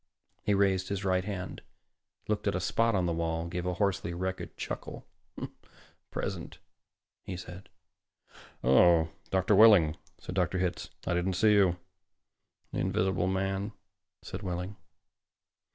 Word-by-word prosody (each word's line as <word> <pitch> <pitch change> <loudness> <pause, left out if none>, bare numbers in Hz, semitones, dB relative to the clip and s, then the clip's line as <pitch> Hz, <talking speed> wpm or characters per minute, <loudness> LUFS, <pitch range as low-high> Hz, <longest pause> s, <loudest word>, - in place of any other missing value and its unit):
He 105 - +2
raised 95 -2 +2
his 100 -1 -2
right 95 -1 +2
hand, 95 -2 -5 0.7
looked 105 -1 -1
at 100 - +1
a - - +1
spot 115 +5 +2
on 90 -2 +2
the 85 - 0
wall, 80 0 -1
gave 90 +1 -3
a 90 - -1
hoarsely 95 -2 0
wretched 95 +1 -4
chuckle. - - -6 1.0
"Present," - - -4 0.7
he 90 - -5
said. 90 +1 -10 0.9
"Oh, 80 +5 +5 0.2
Mr. 95 -1 +3
Wehling," 95 -9 +7 0.2
said - - -7
Dr. 90 -1 +1
Hitz, 90 -1 -2 0.2
"I - - 0
didn't 90 +2 0
see 105 +4 +4
you." 95 -4 +4 1.0
"The - - -1
invisible 95 0 +1
man," 95 +2 -1 0.5
said - - -6
Wehling. 90 +2 -4
95 Hz, 135 wpm, -30 LUFS, 90-100 Hz, 1.0 s, Wehling